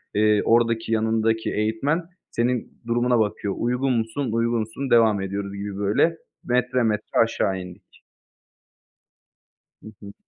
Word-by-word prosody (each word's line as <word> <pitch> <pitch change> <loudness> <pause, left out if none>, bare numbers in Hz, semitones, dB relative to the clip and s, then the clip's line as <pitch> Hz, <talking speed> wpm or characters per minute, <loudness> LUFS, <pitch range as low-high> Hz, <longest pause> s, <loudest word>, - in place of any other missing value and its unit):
eee, 105 0 +3
oradaki, 115 -1 +2
yanındaki 110 0 +1
eğitmen 110 +11 0 0.3
senin 120 0 -2
durumuna 120 +1 +2
bakıyor. 105 -2 -1
"Uygun 125 +2 0
musun, 115 +3 -2
uygunsun, 115 +3 -1
devam 110 -4 +4
ediyoruz" 100 +1 -4
gibi, 100 0 -5
böyle. 105 +12 +2 0.3
Metre 125 0 +1
metre 105 -2 -1
aşağı 105 -4 -1
indik. 90 +1 -13 1.8
Hı - - -10
hı. 100 -1 -10
110 Hz, 115 wpm, -23 LUFS, 105-120 Hz, 1.8 s, devam